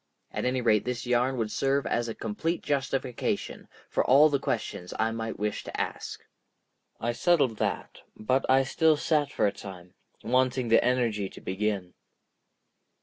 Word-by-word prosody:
At - - -3
any 125 0 +1
rate 110 -3 +3
this 125 -1 -3
yarn 125 +2 +1
would 110 -2 -1
serve 135 +1 +1
as 120 0 0
a 115 - -4
complete 160 +11 -3
justification 135 -3 -2 0.2
for - - +1
all 145 +4 +6
the 140 -2 +1
questions 90 -7 -3
I 110 +1 +1
might 115 0 -4
wish 105 0 -2
to - - -5
ask. - - -4 0.7
I 120 - 0
settled 140 -4 +2
that, - - -3 0.2
but 130 +5 +1
I 135 +1 +5
still 155 +3 +3
sat 145 -2 +1
for - - +1
a 100 - +3
time, 90 -3 -10 0.3
wanting 130 0 +1
the 115 - +5
energy 115 -5 +1
to - - -12
begin. 95 -2 -2
125 Hz, 160 wpm, -28 LUFS, 110-135 Hz, 0.7 s, all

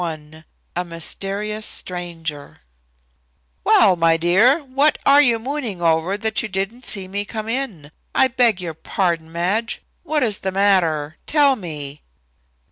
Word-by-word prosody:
XXXI 155 -1 -7 0.3
A 180 - 0
MYSTERIOUS 195 +5 -3
STRANGER 165 -5 -4 1.0
"Well, 195 -4 +5
my 165 -1 +3
dear, 215 - +3
what 275 +3 +2
are 280 +1 +7
you 240 -5 +3
mooning 245 -5 -4
over 165 +3 +1
that 220 0 0
you 215 - -5
didn't 195 +6 -4
see 195 -3 -1
me 200 +2 -3
come 215 +1 -6
in? 225 - -4 0.2
I 265 - +5
beg 240 -6 +2
your 170 -3 -5
pardon, 165 0 -2
Madge, 195 +8 -1 0.2
what 300 -1 0
is 215 -4 0
the 190 - -3
matter? 170 -6 +1
Tell 290 -3 +4
me." 150 - -7
195 Hz, 140 wpm, -20 LUFS, 165-230 Hz, 1.0 s, are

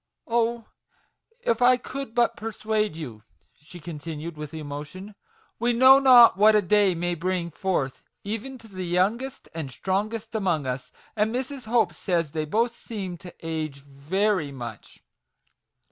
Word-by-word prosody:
Oh, 235 0 0 0.8
if - - 0
I 250 +1 +6
could 260 -2 -7
but 235 -1 +3
persuade 215 -3 -2
you 125 -10 -7 0.2
\" - - -42
she 160 +4 -12
continued, 160 0 -6
with 150 -1 -7
emotion: 155 +6 -7 0.2
" - - -36
we 240 +1 +2
know 260 +3 +8
not 250 -6 +8
what 215 +2 +6
a 210 - +5
day 200 0 +3
may 175 +1 -1
bring 175 0 -2
forth 155 -7 -2 0.2
even 225 +6 -5
to 230 -2 -15
the 185 -3 -6
youngest 210 +10 0
and 160 -4 -4
strongest 210 - -2
among 180 -9 0
us; 125 0 -4 0.2
and 215 0 +1
Mrs. 260 +1 -4
Hope 220 -6 +2
says 170 -2 -1
they 155 0 -2
both 230 +9 +1
seem 195 -8 -6
to 180 -2 -10
'age 155 -3 -3
5 - - -26
very 160 +4 0
much. 120 -5 -9
190 Hz, 160 wpm, -25 LUFS, 155-230 Hz, 0.8 s, know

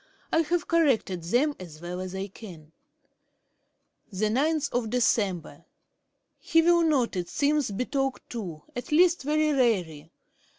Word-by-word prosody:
I 325 - +4
have 340 +2 -1
corrected 270 - +1
them 270 - +1
as 165 -4 -10
well 175 +2 -6
as 185 0 -6
I 190 +1 -3
can. 180 -6 -12 1.4
'Dec. 235 - +1
9. - - -15 0.8
He 330 - +3
will 345 0 +4
not, 285 -10 +1
it 175 -1 -3
seems, 295 -2 +1
be 205 +5 -2
talked 270 -1 -2
to 180 -10 -6
at 245 - -6
least 345 +3 +4
very 305 +2 +1
rarely. 180 - 0
245 Hz, 130 wpm, -27 LUFS, 185-300 Hz, 1.4 s, I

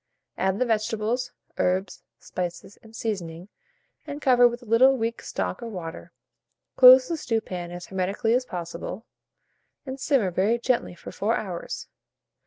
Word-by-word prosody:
Add 190 0 0
the 255 - +1
vegetables, 225 +2 -1 0.3
herbs, 185 +1 0 0.2
spices, 180 +2 -6
and 220 0 -16
seasoning, 180 -5 -4 0.6
and 290 0 -5
cover 245 -3 +5
with 240 +1 -5
a - - -14
little 255 +4 +5
weak 230 0 -2
stock - - -3
or 235 - -5
water; 175 -4 -7 0.6
close 255 0 +9
the 335 - -2
stewpan 215 - -3
as 175 0 -8
hermetically 195 +4 -1
as 250 +1 +2
possible, 175 +1 -6 0.8
and 265 0 -6
simmer 260 -9 +2
very 200 +7 +2
gently 240 -6 -1
for 170 - -10
4 220 +3 0
hours. 180 -5 -5
220 Hz, 145 wpm, -25 LUFS, 185-245 Hz, 0.8 s, close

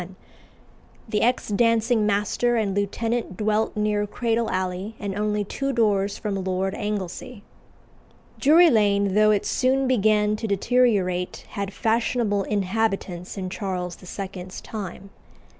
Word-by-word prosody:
The 210 -1 0
ex 245 0 +1
dancing 225 +1 +2
master 210 +4 +1
and 210 -4 0
lieutenant 215 0 -2
dwelt 215 0 0
near 210 0 0
Cradle 230 +1 -1
Alley 185 +3 -3
and 200 -2 -4
only 210 0 0
two 275 +7 -3
doors 205 -5 +1
from 200 -3 -3
Lord 190 +1 -1
Anglesey. 210 +3 -5 1.0
Drury 325 +4 +6
Lane, 200 -3 +2
though 215 +1 +5
it 210 -1 +2
soon 265 +1 +1
began 215 -3 +3
to 220 - -4
deteriorate, 200 -4 +1
had 200 -1 -4
fashionable 225 -1 0
inhabitants 195 -3 -2
in 185 -1 -4
Charles 180 -2 -3
II.'s 185 0 -7
time. 200 -2 -7
210 Hz, 125 wpm, -24 LUFS, 195-225 Hz, 1.0 s, Drury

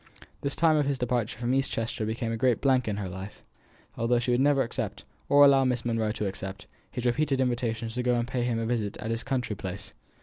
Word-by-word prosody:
The 140 - -1
time 160 +1 +3
of 145 -2 +2
his 140 -1 0
departure 120 -3 -1
from 120 +1 -1
East 135 0 +1
Chester 115 -1 -2
became 115 +1 -2
a - - -1
great 120 0 +2
blank 130 -3 +2
in 105 -2 -1
her 100 -2 -3
life, 95 +2 -8 0.5
although 115 +1 +2
she 120 +1 0
would 120 - +3
never 140 -1 +4
accept, 110 -4 -4 0.2
or 145 0 +8
allow 135 -1 +6
Miss 125 -2 0
Monro 115 -2 0
to 105 - -3
accept, 95 +1 -5 0.2
his 125 -1 -5
repeated 135 +2 +1
invitations 120 -3 -1
to 125 - -1
go 125 0 +2
and 120 0 0
pay 125 0 -2
him 120 -1 0
a 115 - -1
visit 110 -4 -1
at 110 - -4
his 115 0 -1
country 125 -5 -2
place. 95 +1 -6
120 Hz, 235 wpm, -28 LUFS, 110-130 Hz, 0.5 s, or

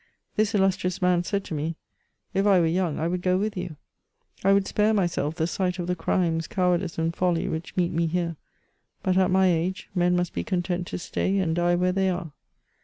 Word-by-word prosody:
This 215 +1 +1
illustrious 190 -2 +1
man 180 -1 +2
said 200 +2 -1
to 185 - -7
me, 150 0 -1
*^ 165 - -5 0.6
If 195 +2 +2
I 195 -3 +6
were 170 - +3
young 170 -1 0
I 160 - 0
would 180 +1 -2
go 185 0 +2
with 210 +2 -1
you: 180 -3 -5 0.7
I 195 - +4
would 195 0 +3
spare 215 +1 +2
myself 170 -5 0
the 160 - 0
sight 180 +1 -1
of 175 - -3
the 180 +1 -1
crimes, 165 -2 0
cowardice, 180 -1 0
and 165 +1 -1
folly 175 -2 +1
which 160 +3 -5
meet 175 -2 +2
me 165 0 +1
here; 170 0 -1 0.7
but 185 - +1
at 185 0 +3
my 190 0 +4
age, 180 +1 0
men 180 -1 +2
must 175 -1 -1
be - - -2
content 180 -3 -2
to - - -4
stay 190 +2 -1
and 170 -4 +1
die 175 0 +2
where 180 +1 +2
they 190 0 +1
are. 175 -3 -3
180 Hz, 220 wpm, -25 LUFS, 170-190 Hz, 0.7 s, I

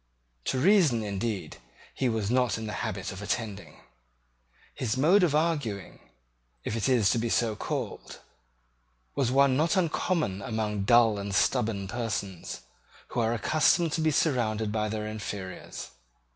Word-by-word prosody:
To - - 0
reason, 155 - +4
indeed, 100 0 -3 0.4
he 130 - 0
was 110 -2 -1
not 125 -2 +2
in 110 - -5
the 105 - -4
habit - - -3
of 95 - -8
attending. 105 -1 -4 0.9
His 120 -1 -2
mode 170 +9 +5
of 165 -5 +3
arguing, 145 - -1 0.6
if 105 - -3
it 115 +3 0
is 115 -7 +4
to 120 - +1
be 115 +1 -1
so 115 -1 +1
called, - - -5 1.0
was 130 -4 +1
one 135 0 +4
not 160 +6 +2
uncommon 165 - 0
among 105 -2 -2
dull 115 -2 +5
and 100 -1 -3
stubborn 100 -1 +1
persons, 100 -5 -4 0.5
who 120 - -2
are 115 0 +1
accustomed 155 +6 +2
to 160 - -1
be 160 - +3
surrounded 115 -8 +1
by 110 0 -1
their 105 0 -3
inferiors. 100 -3 -6
115 Hz, 145 wpm, -28 LUFS, 105-140 Hz, 1.0 s, mode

